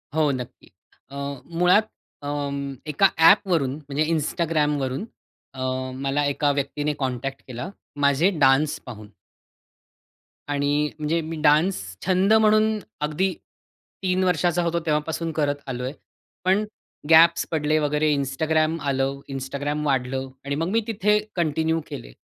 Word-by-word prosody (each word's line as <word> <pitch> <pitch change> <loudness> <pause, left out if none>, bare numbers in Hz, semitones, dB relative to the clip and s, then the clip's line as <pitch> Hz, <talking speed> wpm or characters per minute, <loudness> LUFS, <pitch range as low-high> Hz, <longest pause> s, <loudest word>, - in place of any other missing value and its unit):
हो, 155 -2 +3
नक्की. 125 -2 -7 0.4
अ, - - -9 0.4
मुळात 185 +5 +4 0.4
अं, 140 -1 -3 0.2
एका 195 +7 +5
ॲपवरून 165 -6 +4
म्हणजे 145 0 -2
Instagramवरून 150 -2 0 0.5
अ, 130 - -8 0.3
मला 140 +2 -1
एका 145 +1 +1
व्यक्तीने 145 +1 -1
कॉन्टॅक्ट 135 -1 -4
केला 125 +7 -6 0.3
माझे 140 +6 +4
डान्स 140 +2 +3
पाहून. 110 -5 -9 1.4
आणि 145 +1 +1
म्हणजे 155 +2 0
मी 160 +1 -5
डान्स 155 +5 +4 0.3
छंद 190 +3 +3
म्हणून 215 0 +4 0.2
अगदी 165 +6 0 0.7
3 185 0 +1
वर्षाचा 175 -1 +2
होतो, 170 0 0
तेव्हापासून 160 +1 -1
करत 145 -2 0
आलो 125 -1 -4
आहे. 130 +2 -3 0.5
पण 190 +3 +3 0.5
गॅप्स 170 +1 +6
पडले 155 -1 +1
वगैरे 150 +1 +1
Instagram 155 +4 0
आलं, 135 0 -1
Instagram 140 +3 -3
वाढलं 130 -1 -1 0.2
आणि 140 - -2
मग 165 +4 -1
मी 225 +4 +2
तिथे 210 -1 +2 0.2
कंटिन्यू 160 -1 +1
केले. - - -8
150 Hz, 125 wpm, -24 LUFS, 140-170 Hz, 1.4 s, गॅप्स